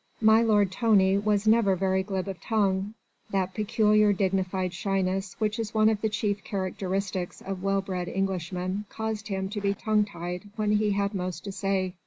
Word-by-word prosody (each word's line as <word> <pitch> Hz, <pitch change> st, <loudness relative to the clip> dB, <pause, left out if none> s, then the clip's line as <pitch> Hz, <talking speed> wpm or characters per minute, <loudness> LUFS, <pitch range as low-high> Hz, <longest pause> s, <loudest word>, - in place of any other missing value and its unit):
My 220 Hz, +1 st, +6 dB
lord 205 Hz, -4 st, +3 dB
Tony 195 Hz, -3 st, +3 dB
was 210 Hz, 0 st, +1 dB
never 215 Hz, -3 st, +4 dB
very 190 Hz, +1 st, +1 dB
glib 190 Hz, -1 st, -3 dB
of 190 Hz, -3 st, -6 dB
tongue. 200 Hz, -1 st, 0 dB, 0.3 s
That 190 Hz, -2 st, -1 dB
peculiar 215 Hz, 0 st, +3 dB
dignified 190 Hz, -1 st, -1 dB
shyness 190 Hz, +1 st, -1 dB
which 215 Hz, +1 st, 0 dB
is 220 Hz, -1 st, -4 dB
one 215 Hz, 0 st, +5 dB
of 215 Hz, -2 st, -1 dB
the 220 Hz, -, +1 dB
chief 210 Hz, -2 st, -1 dB
characteristics 190 Hz, -1 st, -3 dB
of 195 Hz, -1 st, -6 dB
well 195 Hz, 0 st, +1 dB
bred 180 Hz, -2 st, -4 dB
Englishmen 185 Hz, +1 st, -2 dB
caused 220 Hz, -1 st, -4 dB
him 190 Hz, -2 st, -2 dB
to 205 Hz, 0 st, -4 dB
be 200 Hz, 0 st, +1 dB
tongue 210 Hz, 0 st, +1 dB
tied 180 Hz, 0 st, -6 dB
when 215 Hz, -1 st, 0 dB
he 210 Hz, -1 st, +1 dB
had 200 Hz, +1 st, 0 dB
most 180 Hz, -2 st, -4 dB
to 200 Hz, -, -5 dB
say. 190 Hz, -2 st, -1 dB
195 Hz, 180 wpm, -27 LUFS, 190-210 Hz, 0.3 s, My